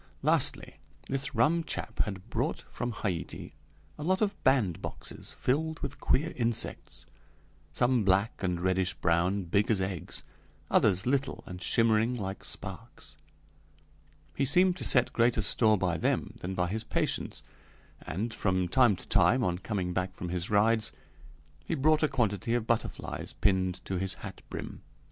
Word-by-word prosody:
Lastly, - - +2 0.3
this 135 0 -2
rum 160 +9 +3
chap - - -4
had 95 -1 -7
brought 120 - -1
from 120 0 -5
Haiti 95 -6 -4 0.5
a - - -4
lot 185 +4 +2
of 205 -2 +1
bandboxes 120 -11 -1
filled 160 +5 -1
with 140 - -5
queer 160 +5 +1
insects 115 -2 -2 0.7
some 120 +7 +2
black 95 +3 +2
and 90 -3 -1
reddish 95 +1 +1
brown, 90 +4 +1
big 100 +4 +1
as 110 -4 +3
eggs; 95 -2 -3 0.5
others 95 -1 +3
little 140 +2 0
and 90 0 -8
shimmering 115 +3 +2
like 95 -4 -5
sparks. - - -7 1.2
He 140 - 0
seemed 180 +6 +4
to - - -6
set 125 -2 +3
greater 115 -2 +3
store 110 +2 +3
by 90 -3 0
them - - 0
than 95 +2 -4
by 90 -1 0
his 110 +3 -2
patients, - - -2 0.6
and, 110 +7 -3
from 95 -2 0
time 120 0 +5
to - - -13
time, 125 0 +4
on 90 -3 0
coming 95 -3 -2
back 95 +1 -2
from 90 - -5
his 90 +1 -2
rides, 110 +1 +3 0.7
he - - -2
brought 155 +2 +3
a 155 - +4
quantity 115 -4 0
of 120 -2 0
butterflies 115 -1 -2
pinned 95 -3 0
to 95 -2 -2
his 95 0 -1
hat - - -9
brim. - - -6
110 Hz, 155 wpm, -30 LUFS, 95-125 Hz, 1.2 s, time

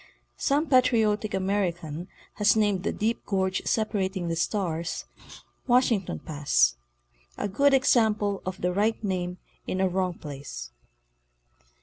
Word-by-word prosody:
Some 290 +3 +2
patriotic 225 -5 +3
American 180 -4 -2 0.3
has 210 -1 +4
named 205 -4 +2
the - - -1
deep 225 +2 -1
gorge 190 -1 0
separating 190 -5 -1
the 165 - -1
"Stars" 170 -2 -2 0.6
"Washington 240 -6 +2
Pass," 145 - +2 0.6
a - - -1
good 275 +8 +3
example 215 -6 +2
of 185 0 -5
the 180 0 0
right 215 +4 0
name 180 -2 -2 0.3
in 185 - -2
a 190 - +3
wrong 185 -1 -1
place. 140 - -8
195 Hz, 120 wpm, -27 LUFS, 180-215 Hz, 0.6 s, has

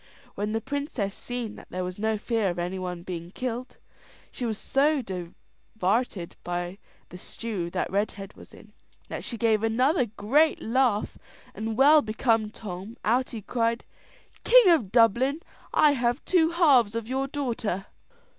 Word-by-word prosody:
When 205 +1 -3
the 225 +1 -1
princess 265 -7 -3
seen 240 -3 -5
that - - -13
there 185 0 -3
was 180 +2 -5
no 220 0 0
fear 220 -2 0
of 175 - -4
any 180 +2 -3
one 180 -2 -5
being 170 -1 -6
kilt, 250 +4 -5 0.5
she 245 - -3
was 220 -2 -2
so 285 +2 +1
divarted 190 +2 -3
by 175 +2 -4 0.3
the 180 - -10
stew 200 -4 -5
that 180 +1 -2
Redhead 200 0 -2
was - - -15
in, - - -16 0.4
that - - -5
she 235 - -3
gave 220 -2 +2
another 250 +5 +2
great 255 +10 +2
laugh; 235 -3 0 0.3
and 220 0 -4
well 295 +3 +7
become 220 -1 +1
Tom, 205 +1 -8
out 250 +4 +2
he 220 -3 -7
cried, 230 +1 -1 0.6
"King 485 -6 +7
of 235 - +2
Dublin, 250 +6 +3 0.3
I 300 - +5
have 245 0 0
two 330 -3 +3
halves 275 - +4
of 230 -1 -3
your 265 +2 -1
daughter." 230 -9 -3
225 Hz, 155 wpm, -26 LUFS, 195-255 Hz, 0.6 s, well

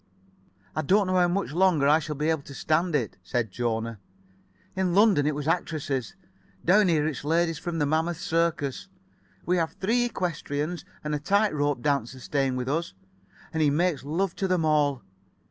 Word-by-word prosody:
"I 155 - 0
don't 195 +7 +3
know 185 0 +1
how 180 -1 +4
much 190 0 -1
longer 170 -5 +3
I 150 +2 +5
shall 150 -1 -5
be 150 +3 0
able 160 -3 -1
to 140 0 -11
stand 160 +3 +1
it," 115 -9 -1
said 115 +4 -2
Jona. 115 -1 -2 0.8
"In 185 -2 0
London 200 -8 +5
it 150 - 0
was 145 0 -4
actresses. 155 -3 -1 0.5
Down 200 +3 +5
here 155 -4 +2
it's 155 -4 -3
ladies 165 +1 +1
from 175 -1 -4
the 150 - +1
Mammoth 160 +3 0
Circus. 165 -5 -1 0.6
We 180 +1 +2
have 165 -2 -1
three 240 +5 +1
equestriennes 165 -3 -3 0.2
and 150 0 -2
a 150 - 0
tight 200 +7 +2
rope 145 -4 0
dancer 130 -3 -1
staying 135 0 -1
with 125 0 -3
us, 155 - -2 0.6
and 160 - 0
he 150 - +4
makes 155 -2 +1
love 170 +6 -1
to 195 - 0
them 180 -3 +1
all. 145 -4 +2
155 Hz, 180 wpm, -26 LUFS, 140-175 Hz, 0.8 s, I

